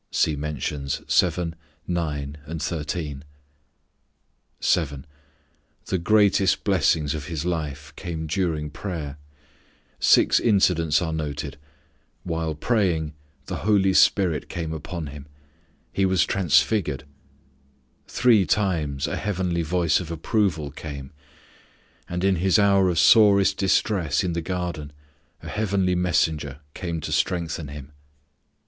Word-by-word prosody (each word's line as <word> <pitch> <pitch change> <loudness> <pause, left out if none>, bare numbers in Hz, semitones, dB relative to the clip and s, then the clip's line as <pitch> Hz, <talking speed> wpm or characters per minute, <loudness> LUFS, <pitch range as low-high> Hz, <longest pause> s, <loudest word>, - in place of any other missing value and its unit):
(See 80 - +1
mentions 70 -1 -3
7, 85 -1 +1 0.3
9 75 -5 -3
and 80 +1 -5
13.) 75 -3 -4 1.4
7. 70 -6 0 0.8
The 95 - -1
greatest 100 0 +3
blessings 85 -6 +2
of 75 -2 -5
His 80 -2 -4
life 75 -4 -4
came 80 -2 -5
during 80 -2 -1
prayer: 75 -6 -6 0.8
Six - - +5
incidents 90 -7 +3
are 80 -2 -2
noted: 75 -2 -4 0.6
while 80 -2 -2
praying, 85 -5 0 0.3
the - - -4
Holy 100 -3 +2
Spirit 90 -6 +3
came 80 -2 -4
upon 80 +1 -5
Him; 70 0 -10 0.7
He 95 -1 +2
was 95 -1 +3
transfigured; 90 -3 +1 1.0
three 115 -5 +4
times 80 -8 0
a - - -2
heavenly 90 -3 -1
voice 85 0 +1
of 90 -3 -7
approval 85 -3 -1
came; 70 -2 -8 1.0
and 90 +1 -3
in 95 -1 +3
His 95 +5 +3
hour 100 -2 +4
of 85 - -1
sorest 100 -1 +6
distress 95 -5 +1
in 90 -2 -1
the 85 - -2
garden 85 -4 -4 0.5
a - - -8
heavenly 100 -3 0
messenger 80 -5 0
came 85 -3 -4
to - - -5
strengthen 85 -3 -1
Him. 70 0 -9
85 Hz, 115 wpm, -24 LUFS, 75-95 Hz, 1.4 s, sorest